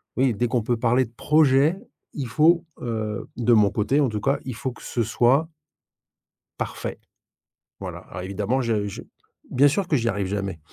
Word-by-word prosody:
oui, 130 -1 +2
dès 120 +4 0
qu'on 120 0 0
peut 120 +2 0
parler 120 +2 +3
de - - -16
projet, 150 +4 +3 0.4
il 140 -4 -4
faut, 165 +6 +4 0.2
heu, 110 -3 -3
de 120 0 +1
mon 105 -3 +5
côté 110 +8 +1
en 140 - +3
tout 105 -3 -3
cas, 140 +5 +1
il 130 -3 -5
faut 130 +1 -3
que - - -15
ce 120 - -2
soit 130 +8 +2 1.1
Parfait. - - -4 0.8
Voilà, - - -6
alors 90 - -6
évidemment 105 +7 -1
je 110 -4 0
je 100 - -7 0.5
bien 140 +3 +5
sûr 175 +6 0
que 150 - +2
j'y 115 -2 -1
arrive 100 -3 -1
jamais. 100 -3 -3
120 Hz, 185 wpm, -24 LUFS, 105-135 Hz, 1.1 s, mon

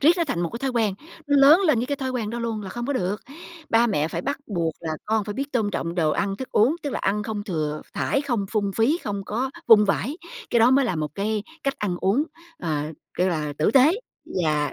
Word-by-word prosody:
riết 295 - +6
nó 340 - +1
thành 225 - -2
một 170 -1 -1
cái 235 - -5
thói 270 +1 -1
quen, 225 -5 +1 0.3
nó 285 0 +3
lớn 285 +6 +8
lên 300 -8 +4
với 245 - -1
cái 285 +1 -2
thói 265 -1 -3
quen 235 -5 -2
đó 235 - -4
luôn 230 -2 -3
là 190 - -7
không 240 +2 -4
có 285 - 0
được. 195 -5 -1 0.5
Ba 230 +1 +5
mẹ 155 -8 0
phải - - -4
bắt 280 +2 -2
buộc 170 -6 -1
là 165 - -4
con 220 -1 +1
phải 205 0 -5
biết 280 +1 -4
tôn 220 -5 +1
trọng 170 -2 -3
đồ 160 -4 +2
ăn 195 +5 -1
thức 260 - -6
uống, 245 +10 +4
tức 290 - -2
là - - -2
ăn 205 +2 0
không 210 -1 -4
thừa 155 -6 -2
thãi, 275 - 0
không 240 -8 -1
phung 205 -3 0
phí, 255 +9 +3
không 200 -1 -3
có 245 +7 -2 0.2
vung 210 -2 +8
vãi, 220 +8 -1 0.3
cái 240 - +3
đó 235 +3 +6
mới 270 0 +4
là 185 - -1
một 155 -1 -3
cái 210 +1 -1 0.2
cách 275 -2 0
ăn 190 -4 -1
uống, 205 +10 +2 0.3
ờ, 155 - -2 0.2
kêu 185 - +2
là 155 -4 -2
tử 155 - +3
tế 275 +5 +7 0.5
và 150 -1 +1
215 Hz, 255 wpm, -24 LUFS, 185-260 Hz, 0.5 s, lớn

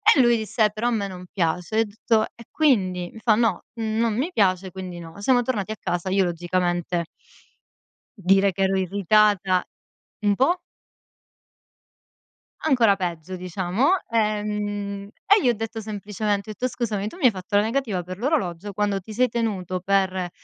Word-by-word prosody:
E 280 - +3
lui 240 -1 +5
disse: 215 0 +1
"Però 220 +3 -2
a - - -1
me 205 -3 -1
non 180 -1 -9
piace", 180 +1 -1
ho - - +4
detto: 220 +1 +1
"E 235 - -12
quindi?", 185 - +2
mi 225 - -10
fa: 220 -1 +3
"No, 225 -5 +1
non 225 0 0
mi 315 +8 -1
piace, 190 -3 +2
quindi 185 -2 -7
no". 165 +3 -10
Siamo 245 +2 +4
tornati 220 -4 -2
a - - -11
casa. 175 +1 -2
Io 195 0 +3
logicamente 175 0 -1 1.1
dire 195 +1 +3
che 195 +2 -1
ero 190 0 +2
irritata 195 0 +3 0.6
Un 205 -1 +4
po'? 335 - +2 2.0
Ancora 240 -9 +4
peggio, 180 -1 -4
diciamo. 185 - 0 0.2
Ehm, 205 -2 -1 0.2
e 410 +1 +5
gli 250 - +4
ho - - +4
detto 225 0 -5
semplicemente, 210 0 -3
ho - - -3
etto: 250 +5 -1
"Scusami, 215 -5 -2
tu - - -13
mi 330 - 0
hai 245 - +7
fatto 195 +2 -2
la - - +5
negativa 220 -5 -1
per 185 +1 -7
l'orologio 205 - -1
quando 200 -1 -1
ti 215 - -11
sei 250 +4 +3
tenuto 195 -6 -2
per 190 -2 +1
205 Hz, 165 wpm, -24 LUFS, 185-225 Hz, 2.0 s, hai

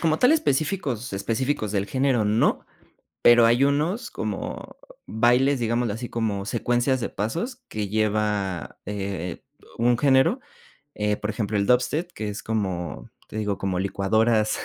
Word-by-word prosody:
como 160 -1 +2
tal 250 - +5
específicos, 145 - 0
específicos 110 +2 -1
del 100 -1 0
género 130 -2 +1
no, 105 +2 +2 0.6
pero 120 -1 +7
hay 120 +4 +4
unos 150 - 0
como - - -5 0.3
bailes, 125 +4 +3
digámoslo 115 -1 0
así, 115 +3 -5
como 105 -4 -2
secuencias 120 +4 0
de - - -2
pasos, 205 - -4
que 105 -2 -3
lleva, 105 -5 -1
eh, 95 -3 -4 0.4
un 120 +1 +3
género, 135 - +3 0.6
eh, 105 0 0
por 105 - -5
ejemplo, 105 -1 -2
el 100 - +1
dubstep, 125 - +1
que 110 - -5
es 105 0 -5
como 90 - -3 0.2
te - - -9
digo, 105 -2 -1
como 95 -2 -1
licuadoras 110 +3 +1
110 Hz, 145 wpm, -24 LUFS, 105-130 Hz, 0.6 s, pero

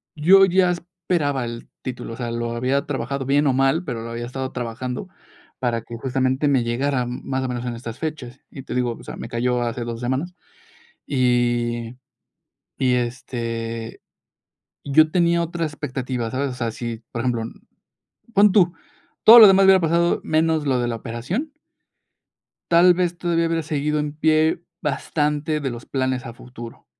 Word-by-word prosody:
yo 190 +6 +6
ya 180 -1 +3
esperaba 170 -7 -2
el 115 0 -7
título, 125 -2 -6
o - - -6
sea, 120 -2 -4
lo 115 0 -3
había 130 +4 0
trabajado 140 -1 -3
bien 145 +2 +2
o 135 - +3
mal, 135 +6 +2
pero 120 -6 -4
lo 115 - -6
había 120 0 -4
estado 130 +2 -5
trabajando, 125 +5 -5 0.5
para 120 -3 -1
que, 115 - -9
justamente, 130 +3 0
me 135 -4 +3
llegara, 125 +2 0
más 130 +2 -3
o - - -1
menos, 120 0 -4
en 120 - -3
estas 115 0 -8
fechas, 140 -5 -5
y 135 - -9
te - - -6
digo, 125 -2 0
o - - -13
sea, - - -8
me 115 - -7
cayó 125 +1 0
hace 120 0 -2
2 115 -1 -5
semanas. 135 +9 -2 0.7
Y 120 -2 0 0.8
y, 125 -1 +2
este, 115 -2 -4 0.8
yo 155 +3 +4
tenía 170 0 +2
otra 170 0 -3
expectativa, 130 -5 -4
¿sabes?, 135 +2 -2
o 125 - -6
sea, 120 -2 -2
si, 115 0 -6
por 115 - -3
ejemplo, 120 -2 0 0.9
pon 200 0 +6
tú, 180 -4 +4 0.5
todo 235 +2 +11
lo 215 - +11
demás 195 0 +6
hubiera 190 -1 +6
pasado, 170 +1 +2
menos 160 -1 +1
lo 130 -2 +1
de 120 - 0
la 115 - -2
operación 125 - -4 1.2
tal 175 +1 +7
vez, 175 -1 -1
todavía 170 -1 0
hubiera 165 0 -1
seguido 150 -1 -1
en 150 -1 -2
pie, 155 +1 +2 0.2
bastante 150 0 -1
de 135 -3 -3
los 120 0 -9
planes 130 -1 -2
a 115 - -8
futuro, 120 -1 -11
130 Hz, 170 wpm, -22 LUFS, 120-160 Hz, 1.2 s, todo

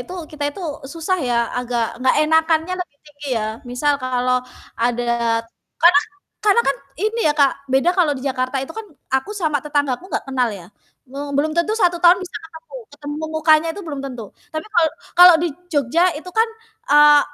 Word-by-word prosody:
itu 365 - -9 0.2
kita 300 -1 -5
itu 340 - -11 0.3
susah 335 +3 -1
ya, 245 -2 0 0.2
agak 245 -1 -1 0.2
enggak 260 - +3
enakannya 320 +2 +2
lebih 355 -5 -7
tinggi, 290 -1 -12
ya. 215 - -2 0.3
Misal 290 +4 +1
kalau 250 0 0 0.3
ada 240 +1 -1 0.8
karena 335 -4 +7 0.4
karena 420 +2 +5
kan 275 - +1 0.3
ini 440 +2 0
ya 300 - +4
Kak, 280 -1 +5 0.2
beda 270 +6 +3
kalau 325 -5 +3
di - - -10
Jakarta 255 0 -1
itu 270 - -8
kan, 445 - -7 0.3
aku 265 +9 0
sama 315 -7 0
tetanggaku 290 0 -1
enggak - - -2
kenal 255 -2 +1
ya, 190 -5 -9 0.4
me 275 - -8 0.2
belum 300 +2 +1
tentu 340 +5 +1
1 355 -4 +3
tahun 355 +1 +7
bisa 365 - -10
ketemu 325 +5 -14 0.2
ketemu 295 0 -6 0.2
mukanya 315 0 +3
tuh 405 - -6
belum 290 -3 -5
tentu. 250 -4 -6 0.3
Tapi, 315 +3 -4
kalau 320 -2 +4 0.3
kalau 355 0 +10
di 345 - +1 0.2
Jogja 290 +3 +1 0.2
itu 360 +4 -10
kan, 450 +1 +4 0.4
eee, 295 0 +7
295 Hz, 180 wpm, -20 LUFS, 265-340 Hz, 0.8 s, kalau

